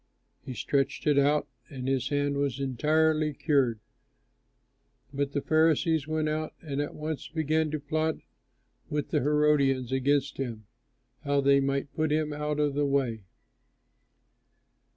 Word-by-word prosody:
He 130 -1 -7
stretched 135 +1 -1
it 145 -2 +4
out, 145 +2 +2 0.2
and 130 -3 -6
his 135 -1 0
hand 145 -1 0
was 140 -2 -1
entirely 155 +3 +1
cured. 135 -7 +1 1.3
But 140 0 -2
the 145 - -1
Pharisees 160 -1 +2
went 155 0 0
out 155 0 -3
and 145 -2 -3
at 145 - -5
once 155 -1 -4
began 160 0 0
to 155 0 -3
plot 155 +2 -1 0.7
with 150 -1 -2
the - - +1
Herodians 140 -3 +2
against 140 +1 +1
him, 115 -5 -5 0.6
how 140 -1 +1
they 140 0 +4
might 140 +1 -1
put 155 -1 0
him 155 0 0
out 150 0 -2
of 145 -1 +1
the 145 0 +1
way. 125 -7 0
145 Hz, 140 wpm, -28 LUFS, 135-155 Hz, 1.3 s, it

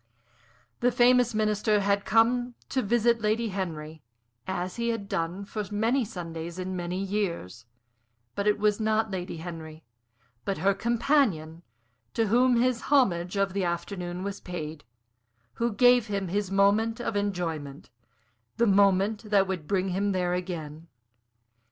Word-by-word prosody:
The 245 +1 +3
famous 245 -1 +4
Minister 215 0 +2
had 200 0 +1
come 240 +2 +2
to 265 - 0
visit 235 +1 +2
Lady 220 +2 0
Henry, 160 -5 -5 0.5
as 185 +1 -3
he 235 0 -1
had 225 -4 -3
done 175 +3 -3
for 210 +1 -4
many 225 +6 +1
Sundays 170 -5 -6
in 185 0 -4
many 175 0 -3
years; 180 - -3 0.7
but 200 +1 -2
it 210 - +3
was 210 0 +1
not 220 0 +1
Lady 180 -2 -4
Henry, 160 -1 -8 0.6
but 195 - -2
her 200 +1 +2
companion, 220 - +1 0.5
to 225 - +2
whom 245 +3 +4
his 250 -1 +1
homage 185 -11 +2
of 195 -1 +1
the 200 -1 -1
afternoon 175 +1 -3
was 200 0 -4
paid, 160 -4 -6 0.8
who 235 0 +2
gave 245 +1 +5
him 195 -3 -2
his 200 +1 -1
moment 205 +4 +2
of 230 -2 -3
enjoyment 165 -10 -3 0.7
the 235 - +3
moment 200 +1 +3
that 200 -2 +4
would 180 -5 -4
bring 190 -1 0
him 195 +2 0
there 180 -1 0
again. 165 -3 -5
200 Hz, 145 wpm, -27 LUFS, 175-225 Hz, 0.8 s, gave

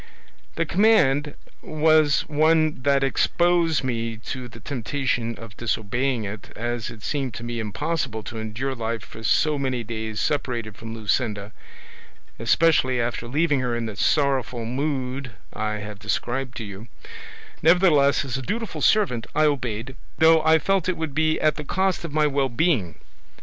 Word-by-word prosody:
"The 165 - 0
command 150 -8 +3 0.3
was 155 -2 +3
one 155 -1 +2
that 140 0 +2
exposed 170 +3 +2
me 115 -3 -2
to 125 +3 -6
the 115 -1 -13
temptation 120 -1 -2
of 115 -3 -11
disobeying 120 +2 -1
it, 105 +1 -7
as 120 0 -3
it 115 -3 -11
seemed 135 -6 -2
to - - -7
me 120 0 -4
impossible 110 +2 -2
to 115 0 -6
endure 110 +5 -3
life 115 -3 -3
for 110 - -11
so 150 +6 +2
many 130 -3 -1
days 110 -1 -5
separated 120 -7 -2
from 115 +1 -8
Luscinda, 105 -2 -1 0.9
especially 130 +1 +3
after 120 0 -2
leaving 145 +2 +1
her 125 -2 -1
in 120 -1 -2
the 110 -2 -5
sorrowful 130 -2 +1
mood 130 -1 -3 0.2
I 105 0 -2
have 105 -1 -6
described 125 +4 -2
to 115 - -4
you; 100 +2 -9 0.7
nevertheless 155 -5 +4
as 130 -1 -3
a - - -4
dutiful 225 - -4
servant 175 - +2
I 155 +1 +4
obeyed, 125 -3 -2 0.2
though 160 0 +6
I 160 0 +5
felt 190 +2 +1
it 185 - -1
would 160 -3 -3
be 155 +1 +1
at 155 -1 +2
the 150 - -4
cost 190 +5 0
of 170 - -5
my 155 +1 +2
well 140 -2 +1
being. 120 - +1
130 Hz, 160 wpm, -24 LUFS, 115-155 Hz, 0.9 s, though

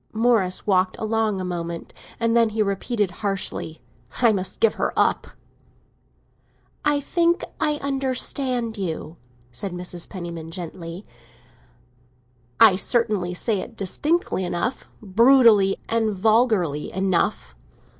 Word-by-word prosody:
Morris 220 -5 +2
walked 185 -2 +2
along 220 -2 0
a - - -3
moment, 170 -2 -5 0.3
and 230 0 +1
then 230 -1 +4
he 215 0 0
repeated 200 0 -1
harshly: 195 -5 -3 0.4
"I 235 -2 +5
must 190 -3 -3
give 225 - +4
her - - -1
up!" - - +2 1.6
"I 295 -1 +2
think 340 +4 +1 0.2
I 300 -2 +2
understand 260 -4 -1
you," 165 -3 -4 0.3
said 180 +10 -4
Mrs. 180 -1 -6
Penniman 170 -3 -7
gently. 170 +2 -7 1.5
"I 185 - +7
certainly 205 -5 0
say 210 +2 0
it 225 +4 -8
distinctly 290 - -1
enough—brutally 215 +2 +3
and 220 -3 0
vulgarly 215 - +2
enough." 185 - 0
205 Hz, 110 wpm, -23 LUFS, 180-235 Hz, 1.6 s, I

